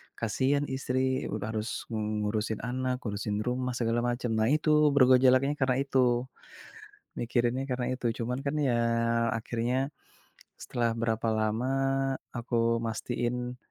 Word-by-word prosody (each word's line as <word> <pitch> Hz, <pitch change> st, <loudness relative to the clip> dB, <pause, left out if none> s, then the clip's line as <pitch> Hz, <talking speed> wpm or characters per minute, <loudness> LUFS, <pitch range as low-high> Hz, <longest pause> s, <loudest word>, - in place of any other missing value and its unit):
Kasihan 130 Hz, +6 st, +1 dB
istri 130 Hz, 0 st, -1 dB
udah 110 Hz, +1 st, -3 dB
harus 110 Hz, 0 st, -3 dB
mengurusin 105 Hz, 0 st, -2 dB
anak, 130 Hz, +1 st, -2 dB
urusin 105 Hz, -1 st, -2 dB
rumah 125 Hz, 0 st, -1 dB
segala 115 Hz, -1 st, 0 dB
macam. 120 Hz, -1 st, -1 dB
Nah 110 Hz, -, +2 dB
itu 150 Hz, +4 st, +2 dB, 0.3 s
bergejolaknya 130 Hz, +1 st, +5 dB
karena 130 Hz, -1 st, +2 dB
itu. 135 Hz, -1 st, 0 dB, 1.2 s
Mikirinnya 120 Hz, +2 st, 0 dB
karena 125 Hz, -1 st, -1 dB
itu. 125 Hz, -1 st, -3 dB, 0.2 s
Cuman 125 Hz, +3 st, -2 dB
kan 140 Hz, -, 0 dB
ya 130 Hz, -5 st, +2 dB, 0.6 s
akhirnya 120 Hz, +4 st, -1 dB, 0.7 s
setelah 120 Hz, -1 st, -1 dB
berapa 115 Hz, 0 st, -1 dB
lama 110 Hz, +3 st, 0 dB, 0.7 s
aku 115 Hz, -1 st, +1 dB
mastiin, 120 Hz, +2 st, -3 dB
120 Hz, 120 wpm, -29 LUFS, 115-130 Hz, 1.2 s, bergejolaknya